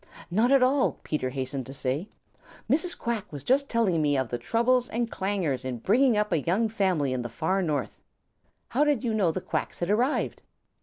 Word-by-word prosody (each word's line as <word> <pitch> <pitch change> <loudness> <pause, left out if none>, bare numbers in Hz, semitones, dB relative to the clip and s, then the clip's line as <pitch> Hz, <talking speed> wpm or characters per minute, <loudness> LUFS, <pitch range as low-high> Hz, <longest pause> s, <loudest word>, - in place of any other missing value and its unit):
"Not 220 +7 +3
at 275 -2 +6
all," 260 +1 +3
Peter 150 -4 -2
hastened 130 0 -4
to 135 - -8
say. 140 +9 -2 0.6
"Mrs. 335 +4 +1
Quack 230 -3 -3
was 145 -3 -7
just 275 - +2
telling 200 -9 +2
me 145 -2 +2
of 130 -3 -1
the 120 - -3
troubles 240 - +1
and 235 0 -2
clangers 185 -10 -1
in 130 -2 -3
bringing 230 - +3
up 210 0 0
a 165 -4 +2
young 200 +9 +1
family 185 -11 0
in 130 - -2
the 120 - -5
Far 190 +9 0
North. 150 - -2 0.7
How 275 +5 +2
did 290 -4 +1
you 230 -3 0
know 200 -5 +2
the 185 - -4
Quacks - - -3
had 175 +3 -1
arrived?" 245 +7 0
195 Hz, 200 wpm, -27 LUFS, 140-235 Hz, 0.7 s, at